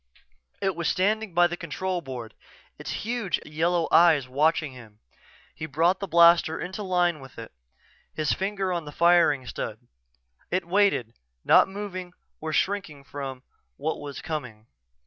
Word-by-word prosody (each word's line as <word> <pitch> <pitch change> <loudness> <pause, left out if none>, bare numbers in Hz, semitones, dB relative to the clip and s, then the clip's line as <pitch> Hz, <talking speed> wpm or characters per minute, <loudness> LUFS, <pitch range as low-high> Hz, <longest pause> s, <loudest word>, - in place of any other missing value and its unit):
It 190 -2 +1
was 170 -1 -2
standing 210 0 0
by 175 0 +6
the 175 0 -1
control 180 +2 -3
board, 125 -6 -7 0.5
its - - -7 0.2
huge 230 -5 -1
yellow 165 +2 0
eyes 160 -6 +5
watching 150 +3 +1
him. 115 -5 -14 0.6
He 155 +2 -6
brought 165 +6 +2
the 200 - -4
blaster 170 -1 +5
into 190 +4 -5
line 180 -4 +1
with 135 -1 -13
it, 115 -1 -8 0.6
his 155 -2 0
finger 195 -1 -2
on 170 -3 -3
the 145 - -8
firing 170 -5 +4
stud. - - -5 0.7
It 185 -1 -1
waited, 185 - +2 0.3
not - - +6
moving 190 -2 -6 0.3
or 160 0 -4
shrinking 180 -5 -1
from 135 -2 -7 0.3
what 155 +3 -2
was 145 -1 -7
coming. 130 -10 -5
170 Hz, 145 wpm, -26 LUFS, 145-185 Hz, 0.7 s, by